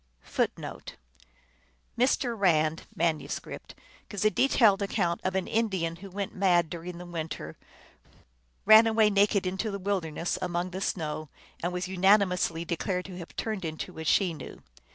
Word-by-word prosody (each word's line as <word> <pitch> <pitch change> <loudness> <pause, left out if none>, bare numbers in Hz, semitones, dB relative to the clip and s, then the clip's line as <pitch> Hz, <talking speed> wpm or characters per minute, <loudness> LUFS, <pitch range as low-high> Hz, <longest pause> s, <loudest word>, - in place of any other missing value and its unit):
1 - - +4
1 - - -8 1.1
Mr. 245 0 +1
Rand 160 -6 +2
(manuscript) 160 -1 -3 0.3
gives 205 -1 -3
a 215 - +5
detailed 220 -7 +4
account 185 -4 0
of 185 0 -1
an 190 -1 0
In 225 +1 +1
dian 165 -4 -2
who 195 +3 -10
went 195 +1 -4
mad 175 -4 +2
during 175 +1 -6
the 180 - -8
winter, 160 - -5 1.1
ran 220 +2 +8
away 220 -1 +4
naked 200 0 +3
into 190 +4 -2
the 200 - -3
wilderness 180 -4 -2
among 180 0 -2
the 190 +1 -5
snows, 155 -4 -2 0.3
and 175 - -1
was 180 0 -3
unanimously 185 -3 +2
declared 180 +2 -2
to 185 -2 -8
have 170 - -10
turned 215 -4 -3
into 160 0 -5
a - - -4
Chenoo. 165 -2 0
185 Hz, 155 wpm, -28 LUFS, 170-200 Hz, 1.1 s, ran